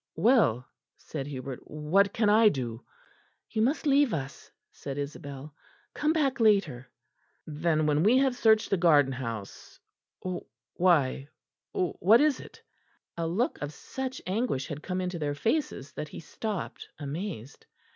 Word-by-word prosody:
"Well," 210 Hz, -, +3 dB, 0.3 s
said 140 Hz, -3 st, -6 dB
Hubert, 130 Hz, -2 st, -6 dB
"what 165 Hz, +7 st, +1 dB
can 220 Hz, -2 st, +1 dB
I 215 Hz, +1 st, +6 dB
do?" 120 Hz, -, -4 dB, 0.7 s
"You 220 Hz, -, 0 dB
must 275 Hz, +8 st, +1 dB
leave 280 Hz, -, +4 dB
us," 135 Hz, -2 st, -7 dB, 0.2 s
said 140 Hz, -1 st, -7 dB
Isabel; 145 Hz, 0 st, -6 dB, 0.4 s
"come 300 Hz, +1 st, +1 dB
back 285 Hz, -6 st, +1 dB
later." 185 Hz, -, +2 dB, 0.6 s
"Then 155 Hz, 0 st, 0 dB
when 150 Hz, 0 st, +2 dB
we 220 Hz, +8 st, +5 dB
have 265 Hz, -1 st, +2 dB
searched 220 Hz, -2 st, +3 dB
the 195 Hz, -, +3 dB
garden 150 Hz, -6 st, +4 dB
house 115 Hz, -6 st, -7 dB, 0.9 s
why, 145 Hz, -7 st, +2 dB, 0.4 s
what 185 Hz, +5 st, +3 dB
is 295 Hz, -3 st, +3 dB
it?" -, -, -13 dB, 0.5 s
A 165 Hz, -1 st, -2 dB
look 200 Hz, +10 st, -1 dB
of 145 Hz, +1 st, -4 dB
such 260 Hz, -, -6 dB
anguish 190 Hz, -, -1 dB
had 145 Hz, +1 st, -5 dB
come 185 Hz, +2 st, -3 dB
into 180 Hz, -1 st, -3 dB
their 145 Hz, -1 st, -2 dB
faces 220 Hz, -, -1 dB
that 150 Hz, -, -5 dB
he -, -, -9 dB
stopped 205 Hz, +4 st, -5 dB
amazed. 145 Hz, -, -6 dB
170 Hz, 140 wpm, -28 LUFS, 140-220 Hz, 0.9 s, I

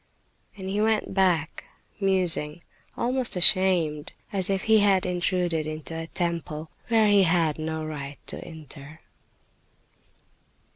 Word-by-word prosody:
And 190 Hz, -1 st, -7 dB
he 200 Hz, +2 st, -1 dB
went 220 Hz, -2 st, 0 dB
back 180 Hz, -5 st, 0 dB, 0.4 s
musing, 180 Hz, -5 st, +2 dB, 0.3 s
almost 250 Hz, -2 st, 0 dB
ashamed, 180 Hz, -5 st, +3 dB, 0.2 s
as 195 Hz, 0 st, +2 dB
if 195 Hz, -1 st, -1 dB
he 220 Hz, -1 st, +4 dB
had 195 Hz, -2 st, +3 dB
intruded 175 Hz, -3 st, 0 dB
into 155 Hz, +1 st, -6 dB
a 165 Hz, 0 st, -5 dB
temple 165 Hz, -3 st, -4 dB, 0.2 s
where 225 Hz, -2 st, +3 dB
he 205 Hz, -1 st, +5 dB
had, 165 Hz, -4 st, +1 dB
no 160 Hz, 0 st, -4 dB
right 145 Hz, -2 st, -7 dB
to -, -, -5 dB
enter. 155 Hz, -1 st, -12 dB
175 Hz, 125 wpm, -25 LUFS, 155-195 Hz, 0.4 s, he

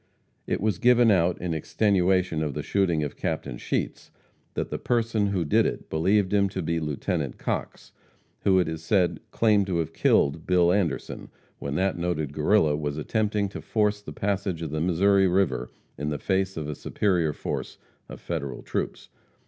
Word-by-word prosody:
It -, -, -1 dB
was 105 Hz, 0 st, 0 dB
given 120 Hz, -1 st, +5 dB
out, 90 Hz, -2 st, +2 dB
in 90 Hz, -2 st, -2 dB
extenuation 90 Hz, 0 st, +1 dB
of 75 Hz, -4 st, -2 dB
the -, -, -3 dB
shooting 85 Hz, -6 st, +1 dB
of 75 Hz, -, -4 dB
Captain -, -, -3 dB
Sheets, -, -, -3 dB, 0.5 s
that -, -, -3 dB
the -, -, -3 dB
person 115 Hz, -3 st, +1 dB
who 95 Hz, -4 st, -1 dB
did 75 Hz, -, +3 dB
it -, -, -6 dB
believed 95 Hz, +5 st, +2 dB
him 100 Hz, -1 st, +3 dB
to 95 Hz, -1 st, -4 dB
be 85 Hz, +1 st, 0 dB
Lieut. 75 Hz, -3 st, -2 dB
Cox, -, -, -4 dB, 0.5 s
who, 95 Hz, -1 st, +3 dB
it 90 Hz, -3 st, +2 dB
is 80 Hz, -1 st, -4 dB
said, 90 Hz, +1 st, +1 dB
claimed 105 Hz, -3 st, +3 dB
to 90 Hz, -3 st, 0 dB
have 80 Hz, -2 st, -2 dB
killed 70 Hz, +3 st, +2 dB
Bill 90 Hz, -1 st, +4 dB
Anderson, 95 Hz, -5 st, -2 dB, 0.3 s
when 70 Hz, 0 st, -4 dB
that 95 Hz, +1 st, 0 dB
noted 80 Hz, -5 st, -2 dB
Guerrilla 75 Hz, 0 st, +3 dB
was 75 Hz, -1 st, -3 dB
attempting 105 Hz, +5 st, 0 dB
to -, -, -7 dB
force 105 Hz, -2 st, 0 dB
the -, -, -9 dB
passage 100 Hz, -4 st, -2 dB
of 80 Hz, -, -4 dB
the 75 Hz, 0 st, -2 dB
Missouri 95 Hz, +3 st, +3 dB
river 90 Hz, -9 st, +1 dB, 0.3 s
in 75 Hz, +1 st, -2 dB
the 75 Hz, -, -2 dB
face 95 Hz, +2 st, -1 dB
of 75 Hz, -2 st, -3 dB
a 75 Hz, -, -3 dB
superior 85 Hz, 0 st, 0 dB
force -, -, -5 dB, 0.3 s
of -, -, -9 dB
Federal 70 Hz, -7 st, -4 dB
troops. -, -, -4 dB
90 Hz, 180 wpm, -26 LUFS, 80-100 Hz, 0.5 s, given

